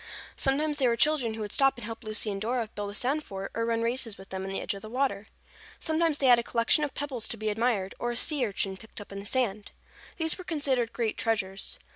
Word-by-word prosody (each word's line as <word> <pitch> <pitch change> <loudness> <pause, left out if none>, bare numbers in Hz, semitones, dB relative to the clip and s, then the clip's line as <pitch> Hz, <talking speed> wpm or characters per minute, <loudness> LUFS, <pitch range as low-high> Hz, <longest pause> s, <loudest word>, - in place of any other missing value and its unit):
Sometimes 295 +2 +1
they 260 - +4
were 235 - +3
children 255 -4 +3
who 220 - -5
would 205 -1 -4
stop 270 -1 +4
and 240 - -6
help 225 +1 -6
Lucy 215 0 -1
and 195 0 -4
Dora 235 +1 0
build 205 -1 -4
a 205 - -6
sand 275 +7 +1
fort 195 -4 -6
or 230 0 -1
run 230 0 +1
races 230 -2 -1
with 195 0 -12
them 190 0 -4
in 190 - -4
the 195 - -2
edge - - -2
of 200 - -8
the 215 - -8
water. 240 -5 0 0.5
Sometimes 320 -1 +1
they 275 - 0
had 245 -2 +8
a - - -1
collection 235 +6 +3
of 290 -3 -2
pebbles 270 -5 -2
to 230 - -3
be 215 0 -1
admired, 210 -3 +1
or 240 - -1
a 240 - -2
sea 265 0 +2
urchin 195 -1 -1
picked 220 +2 -9
up 205 - -10
in 200 - -5
the 200 - -5
sand. 215 -5 0 0.4
These 320 +2 +1
were - - -6
considered 275 -8 0
great 230 -3 -1
treasures. 195 -4 0
230 Hz, 255 wpm, -29 LUFS, 205-270 Hz, 0.5 s, had